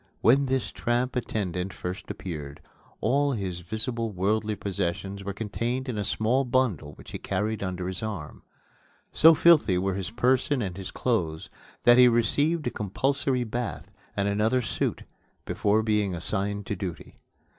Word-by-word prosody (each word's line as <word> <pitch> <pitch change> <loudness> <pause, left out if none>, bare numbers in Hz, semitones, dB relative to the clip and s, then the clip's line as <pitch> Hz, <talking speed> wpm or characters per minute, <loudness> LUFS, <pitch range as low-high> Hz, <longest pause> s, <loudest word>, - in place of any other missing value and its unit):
When 135 +4 +5
this 130 -1 0
tramp 120 +2 -1
attendant 95 -6 -2
first 90 +2 -6
appeared, 75 -6 -6 0.4
all 140 +1 +2
his 95 -6 -3
visible 115 +5 -2
worldly 105 +3 0
possessions 100 0 -3
were 100 - -3
contained 115 +5 -3
in 115 -5 -2
a - - 0
small 115 +7 +1
bundle 120 - 0
which - - -13
he - - -5
carried 110 0 -2
under 90 -2 -3
his 95 -1 -4
arm. 100 -9 -5 0.7
So 160 +1 +7
filthy 150 - +5
were 95 +1 0
his 95 +1 -3
person 130 +4 +2
and 95 -3 -4
his 95 -1 -6
clothes 85 -11 -1 0.3
that 120 +1 +7
he 125 - +9
received 145 +8 +2
a 120 - 0
compulsory 130 +5 0
bath 120 +1 -4 0.3
and 100 0 +1
another 110 +5 +2
suit - - -2 0.4
before 105 +2 +1
being 105 -4 +1
assigned 100 +3 -2
to 100 - -2
duty. 90 -3 -7
110 Hz, 155 wpm, -27 LUFS, 95-125 Hz, 0.7 s, he